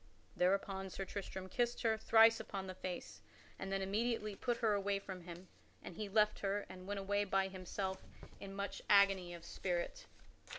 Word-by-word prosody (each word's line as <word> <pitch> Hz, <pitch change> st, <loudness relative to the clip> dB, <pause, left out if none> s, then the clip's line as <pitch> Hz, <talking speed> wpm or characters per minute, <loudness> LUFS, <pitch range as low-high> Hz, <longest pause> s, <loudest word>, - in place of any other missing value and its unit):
Thereupon 195 Hz, +1 st, +1 dB
Sir 195 Hz, +1 st, -4 dB
Tristram 190 Hz, -1 st, -5 dB
kissed 240 Hz, +5 st, 0 dB
her 225 Hz, -1 st, +3 dB
thrice 225 Hz, +1 st, +6 dB
upon 195 Hz, -1 st, -5 dB
the 185 Hz, -, -5 dB
face, 185 Hz, -1 st, -6 dB, 0.4 s
and 195 Hz, -, -4 dB
then 195 Hz, 0 st, 0 dB
immediately 215 Hz, +1 st, 0 dB
put 240 Hz, +3 st, -1 dB
her 225 Hz, -3 st, +2 dB
away 200 Hz, 0 st, +1 dB
from 190 Hz, -2 st, -7 dB
him 175 Hz, +1 st, -9 dB, 0.4 s
and 175 Hz, -, -8 dB
he 210 Hz, +1 st, -4 dB
left 215 Hz, +1 st, +3 dB
her 200 Hz, +1 st, -1 dB
and 185 Hz, 0 st, -10 dB
went 205 Hz, 0 st, -2 dB
away 205 Hz, +1 st, +1 dB
by 195 Hz, -1 st, +1 dB
himself 190 Hz, +1 st, -4 dB, 0.4 s
in 195 Hz, 0 st, -7 dB
much 200 Hz, -1 st, -4 dB
agony 195 Hz, -3 st, +5 dB
of 170 Hz, 0 st, -11 dB
spirit. 175 Hz, -1 st, -3 dB
195 Hz, 175 wpm, -37 LUFS, 190-205 Hz, 0.4 s, thrice